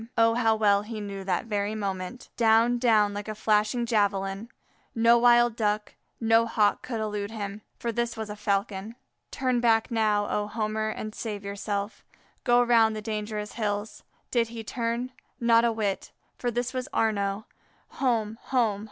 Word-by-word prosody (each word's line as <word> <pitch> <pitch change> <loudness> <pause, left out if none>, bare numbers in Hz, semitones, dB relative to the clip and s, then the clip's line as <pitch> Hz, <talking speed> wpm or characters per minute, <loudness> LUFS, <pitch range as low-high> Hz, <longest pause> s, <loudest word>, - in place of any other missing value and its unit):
Oh, 230 0 +5
how 225 -2 +3
well 205 -2 +3
he 215 +1 -6
knew 200 -1 -6
the 185 -2 0
very 210 -1 -1
moment! 200 +3 -4
Down, 230 +1 +4
down 215 -4 +3
like 205 +1 -5
a 215 - -4
flashing 215 +2 +1
javelin; 200 -1 0 0.5
no 230 +1 +5
wild 240 -1 +5
Duck, 210 -1 -1 0.3
no 225 0 +4
Hawk 210 -2 +2
could 235 -3 -4
elude 210 -2 -3
him, 205 -2 -6 0.2
for 235 - -2
this 235 +1 -2
was 220 -1 -4
a 210 - -6
Falcon. 205 +1 -2 0.3
Turn 255 -2 0
back 225 -1 +2
now, 210 -2 +2
O 210 0 -1
Homer, 215 0 -2
and 215 0 -5
save 210 -3 -5
yourself; 200 +1 -4 0.4
go 245 -1 +4
round 225 -2 +4
the 215 - -4
dangerous 210 -1 -4
hills. 210 -1 -3 0.3
Did 235 -2 +2
he 230 0 -7
turn? 235 +2 -2 0.3
Not 235 0 +4
a 235 - +3
whit! 210 -3 -2 0.3
for 245 - -1
this 245 +2 -2
was 255 +2 -3
Arnaux. 205 -1 0 0.4
Home! 225 -4 -1
home! 230 -6 +1
220 Hz, 165 wpm, -27 LUFS, 205-235 Hz, 0.5 s, Oh